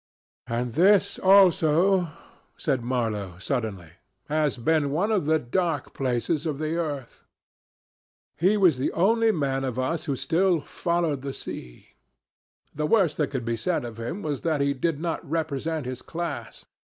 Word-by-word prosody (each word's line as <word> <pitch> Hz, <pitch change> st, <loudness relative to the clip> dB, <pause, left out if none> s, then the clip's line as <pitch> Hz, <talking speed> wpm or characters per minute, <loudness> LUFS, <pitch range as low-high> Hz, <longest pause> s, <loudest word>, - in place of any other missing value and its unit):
"And 120 Hz, 0 st, -2 dB
this 195 Hz, +6 st, +4 dB
also," 185 Hz, -1 st, +5 dB, 0.5 s
said 135 Hz, -5 st, 0 dB
Marlow 110 Hz, -7 st, -2 dB
suddenly, 100 Hz, -, -3 dB, 0.4 s
"has 150 Hz, -2 st, +1 dB
been 145 Hz, +4 st, +1 dB
one 180 Hz, +10 st, 0 dB
of 195 Hz, -9 st, +1 dB
the 160 Hz, 0 st, +4 dB
dark 155 Hz, +2 st, -2 dB
places 135 Hz, +5 st, -1 dB
of 150 Hz, -3 st, -2 dB
the 155 Hz, +2 st, -2 dB
earth." 145 Hz, -7 st, -4 dB, 1.1 s
He 190 Hz, +6 st, +3 dB
was 175 Hz, -10 st, +4 dB
the 130 Hz, -, 0 dB
only 225 Hz, +6 st, +3 dB
man 135 Hz, -7 st, -1 dB
of 130 Hz, -2 st, -3 dB
us 130 Hz, +6 st, -1 dB
who 140 Hz, -, -1 dB
still 165 Hz, +6 st, +2 dB
"followed 170 Hz, -2 st, -1 dB
the 135 Hz, 0 st, -5 dB
sea." -, -, -8 dB, 0.8 s
The 150 Hz, +1 st, -1 dB
worst 185 Hz, -5 st, +3 dB
that 150 Hz, -, 0 dB
could 130 Hz, -4 st, -4 dB
be 115 Hz, 0 st, 0 dB
said 125 Hz, +4 st, -1 dB
of 115 Hz, -1 st, -8 dB
him 145 Hz, -, -4 dB
was 145 Hz, -4 st, -2 dB
that 160 Hz, -3 st, 0 dB
he 140 Hz, 0 st, +2 dB
did 145 Hz, +2 st, -1 dB
not 165 Hz, 0 st, -3 dB
represent 160 Hz, -1 st, -2 dB
his 130 Hz, 0 st, -5 dB
class. 160 Hz, -9 st, -6 dB
150 Hz, 155 wpm, -26 LUFS, 130-170 Hz, 1.1 s, also